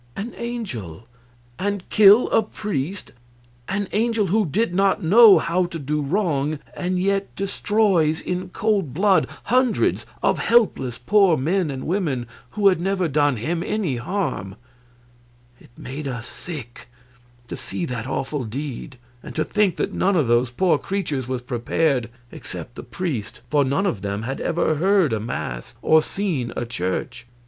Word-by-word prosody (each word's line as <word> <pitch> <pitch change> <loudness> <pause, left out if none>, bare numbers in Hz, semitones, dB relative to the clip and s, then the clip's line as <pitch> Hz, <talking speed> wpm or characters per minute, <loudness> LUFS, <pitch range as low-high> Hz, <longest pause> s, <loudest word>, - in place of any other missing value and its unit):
An 220 +5 -5
angel, 130 - -6 0.5
and 200 -1 -2
kill 210 +3 +7
a - - +4
priest! 200 -5 -4 0.6
An 200 0 -1
angel 225 0 +1
who 215 -3 +3
did 205 +5 0
not 195 0 +2
know 205 +3 +8
how 170 +3 +1
to 170 - -6
do 150 0 -2
wrong, 155 -2 0 0.2
and 180 0 -1
yet 195 +1 0
destroys 195 -5 +1
in 180 0 -4
cold 195 - -1
blood 195 +2 +3 0.2
hundreds 255 -1 +1 0.2
of - - +2
helpless 160 - +2
poor 190 +4 +4
men 170 +5 0
and 135 -2 -5
women 155 -9 -1 0.3
who 205 -1 +4
had 180 -3 0
never 190 -1 0
done 145 -3 +2
him 165 +10 -2
any 180 - -1
harm! 120 - -3 1.0
It - - -19
made 140 +3 -6
us 125 -3 -5
sick 130 -11 -9 0.6
to - - -5
see 140 +6 -4
that 125 -4 -4
awful 135 +1 -2
deed, 130 +3 -6 0.2
and - - -10
to 155 - +1
think 205 -3 +1
that - - -2
none 195 +1 +1
of 150 -8 +2
those 120 +1 +3
poor 175 +9 +2
creatures 155 -10 -3
was 130 -1 -3
prepared 125 +1 0 0.2
except 120 - -8
the - - -8
priest, 125 - -4
for 145 -1 +4
none 140 +9 0
of 115 - -1
them 100 +1 -3
had 135 +3 -4
ever 165 -2 0
heard 185 - +3
a 110 - 0
mass 65 - -5
or 155 0 +5
seen 155 -10 -2
a 120 - -2
church. 120 +3 -4
160 Hz, 155 wpm, -22 LUFS, 130-195 Hz, 1.0 s, know